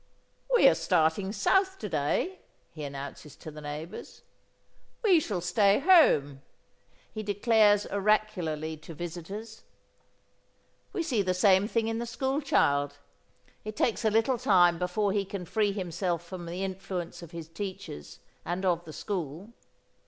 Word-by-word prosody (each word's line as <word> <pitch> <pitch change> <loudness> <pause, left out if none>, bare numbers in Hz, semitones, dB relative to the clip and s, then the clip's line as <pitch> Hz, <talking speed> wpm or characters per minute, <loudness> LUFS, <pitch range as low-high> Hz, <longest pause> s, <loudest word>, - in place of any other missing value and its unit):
"We 475 - +7
are - - +7
starting 165 +3 +1
south 380 - +2
to - - -5
day," 380 +1 -1 0.3
he 155 - -8
announces 140 +1 -7
to 155 - -10
the 150 0 -10
neighbours. 150 +3 -8 0.8
"We 375 -7 +6
shall 205 - -3
stay 200 +2 +3
home," 275 - +4 0.7
he 215 - -4
declares 205 0 +3
oracularly 190 -7 0
to 160 +1 -11
visitors. 180 +7 -7 1.3
We 345 - -2
see 255 -10 +1
the 185 -1 0
same 190 +1 +4
thing 225 -1 0
in 225 0 -2
the 235 - -4
school 265 +4 -1
child. 145 - +1 0.7
It 215 0 -6
takes 230 +2 0
a 220 - +4
little 225 +3 +2
time 175 -5 +4
before 190 +3 0
he 205 -1 +1
can 195 -1 -6
free 210 +3 +1
himself 175 -3 -2
from 175 -1 -8
the 180 +3 -4
influence 185 -3 -5
of 170 - -10
his 165 -2 -8
teachers 165 - -7 0.3
and 180 +2 -3
of 175 -1 +1
the 155 - -9
school. 185 +3 -5
190 Hz, 145 wpm, -28 LUFS, 165-215 Hz, 1.3 s, We